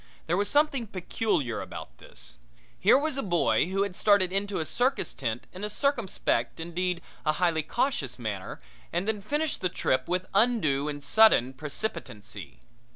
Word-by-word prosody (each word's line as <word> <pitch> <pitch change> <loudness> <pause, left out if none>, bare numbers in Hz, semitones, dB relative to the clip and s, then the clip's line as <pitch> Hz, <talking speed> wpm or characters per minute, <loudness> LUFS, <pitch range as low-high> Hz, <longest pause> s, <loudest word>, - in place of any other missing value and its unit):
There 170 - +1
was 200 +2 +1
something 290 -5 +2
peculiar 180 - -1
about - - -9
this. - - -10 0.4
Here 210 +7 +6
was 285 -1 0
a - - +1
boy 165 - +2
who 195 +2 +1
had 200 -3 -4
started 200 -3 +4
into 200 +1 -1
a 160 - -1
circus 250 - 0
tent 115 +1 -3
in 185 +2 -8
a 210 - -1
circumspect, 205 - 0
indeed, 175 +1 -2 0.2
a 155 - +2
highly 165 -1 +1
cautious 155 - -1
manner, 105 -6 -5 0.3
and 180 +4 -1
then 215 -2 -1
finished 295 +8 -1
the 185 - +1
trip 130 -6 0
with 180 +1 -1
undue 190 - +2
and 145 -1 -6
sudden 145 - +5
precipitancy. 110 - -6
180 Hz, 160 wpm, -28 LUFS, 140-215 Hz, 0.4 s, Here